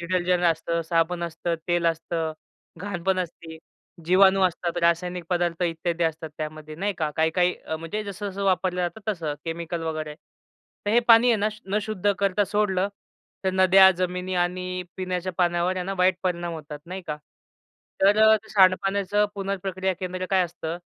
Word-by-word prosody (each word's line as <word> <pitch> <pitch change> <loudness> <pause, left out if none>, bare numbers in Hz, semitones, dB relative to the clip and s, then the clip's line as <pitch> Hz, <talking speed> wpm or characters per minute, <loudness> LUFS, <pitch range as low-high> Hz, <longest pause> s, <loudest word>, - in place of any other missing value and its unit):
Detergent 180 +1 0
असतं, 170 0 +1
साबण 165 +1 0
असतं, 170 0 -2
तेल 175 -1 +2
असतं, 165 -1 -1 0.5
घाण 195 -3 -5
पण 190 +1 +1
असती, 165 -2 -6 0.5
जीवाणू 190 +3 +5
असतात, 170 -1 -3
रासायनिक 175 +1 +1
पदार्थ 175 -1 0
इत्यादी 170 0 -1
असतात, 160 0 -2
त्यामध्ये 155 0 -6
नाही 200 +5 -1
का? 155 -2 0
काही-काही 175 +3 +2 0.2
म्हणजे 165 +6 -4
जसं-जसं 200 0 -5
वापरलं 185 -1 +1
जातं, 175 +4 -3
तसं. 160 -6 -4
केमिकल 170 0 -4
वगैरे. 155 -2 -4 0.7
तर - - +2
हे 235 +3 +5
पाणी 230 +1 +7
आहे 230 - +4
ना, 210 +1 +1 0.2
न 200 +2 0
शुद्ध 205 -1 0
करता 200 +1 +2
सोडलं, 200 -2 0 0.6
तर 190 - +2
नद्या, 190 0 +7
जमिनी 180 +1 -2
आणि 180 +1 -1
पिण्याच्या 185 0 -3
पाण्यावर 175 +1 +1
आहे 180 - -2
ना 195 - -3
वाईट 185 0 +4
परिणाम 175 -2 -2
होतात. 150 -2 -8
नाही 185 +2 -6
का? 150 - -3 0.8
तर 200 +2 +5
अ, 220 0 +7
ते 220 +1 -12
सांडपाण्याचं 195 +1 +3
पुनर्प्रक्रिया 190 -1 -2
केंद्र 185 0 -3
काय 190 -1 +4
असतं? 170 -1 -5
180 Hz, 160 wpm, -25 LUFS, 170-190 Hz, 0.8 s, पाणी